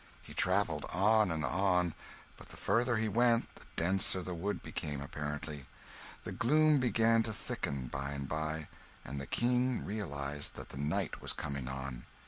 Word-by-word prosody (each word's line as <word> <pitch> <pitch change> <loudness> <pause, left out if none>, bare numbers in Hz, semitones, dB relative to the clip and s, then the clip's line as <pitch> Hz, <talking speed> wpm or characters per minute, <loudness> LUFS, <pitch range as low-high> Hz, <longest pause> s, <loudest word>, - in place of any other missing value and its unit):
He - - -11
travelled 90 -5 +2
on 105 +2 +4
and 80 -3 0
on; 90 +3 +2 0.4
but - - -14
the - - -11
farther 115 +3 +2
he 110 0 +1
went, 115 +2 +3
the - - -14
denser 95 +2 +2
the 90 - -4
wood 100 +5 -2
became, 75 -2 -3
apparently. 75 0 -5 0.6
The - - -5
gloom 150 +4 +4
began 115 -2 +4
to 110 0 -2
thicken, 70 -9 -3
by 70 +3 -4
and 70 -1 -4
by, 80 +1 -2 0.4
and 70 0 -4
the 70 - -6
King 125 +1 +1
realised 75 -9 -3
that - - -8
the - - -9
night 75 +1 -1
was - - -2
coming 70 -3 -4
on. 65 -1 -5
90 Hz, 165 wpm, -34 LUFS, 70-110 Hz, 0.6 s, on